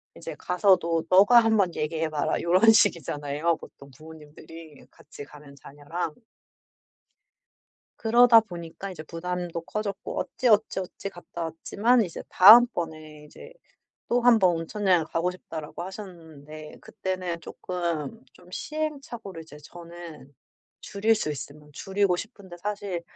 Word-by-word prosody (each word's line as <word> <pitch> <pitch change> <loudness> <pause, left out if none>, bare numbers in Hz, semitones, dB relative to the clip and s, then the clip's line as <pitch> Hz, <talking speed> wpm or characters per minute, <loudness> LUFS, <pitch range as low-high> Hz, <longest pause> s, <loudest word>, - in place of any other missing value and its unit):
이제 - - -8
가서도 180 -3 +1
"너가 205 +6 +7
한번 220 -6 +2
얘기해 160 +1 -2
봐라." 150 -2 -1
요런 185 +6 +5
식이잖아요 150 -4 +1
보통 140 - -15
부모님들이, 155 0 -13
같이 145 -1 -12
가는 145 -1 -15
자녀랑. 145 +4 -6 1.8
그러다 235 0 +6
보니까 175 -1 -8
이제 170 -4 -8
부담도 175 +1 -5
커졌고 200 +2 -5
어찌 255 - -1
어찌 215 -3 +2
어찌 190 +1 -7
갔다왔지만 175 +7 -1
이제 175 -6 -6
다음 220 +6 +9
번에 155 - -7
이제 310 - -14 0.6
"또 245 - +2
1 240 -1 +5
번 185 -3 +4
온천 195 +6 -5
여행을 175 -4 +3
가고 165 +2 -1
싶다."라고 165 -3 -8
하셨는데 160 -6 -10
그때는 185 -4 -5
조금 175 - -5
좀 180 0 -19
시행착오를 275 - -6
이제 160 -2 -14
저는 170 -3 -12 0.5
줄일 215 +3 +1
수 205 -8 -2
있으면 150 +1 -9
줄이고 195 +3 0
싶은데 195 -4 -9
사실 200 -2 -4
175 Hz, 295 characters per minute, -26 LUFS, 160-205 Hz, 1.8 s, 다음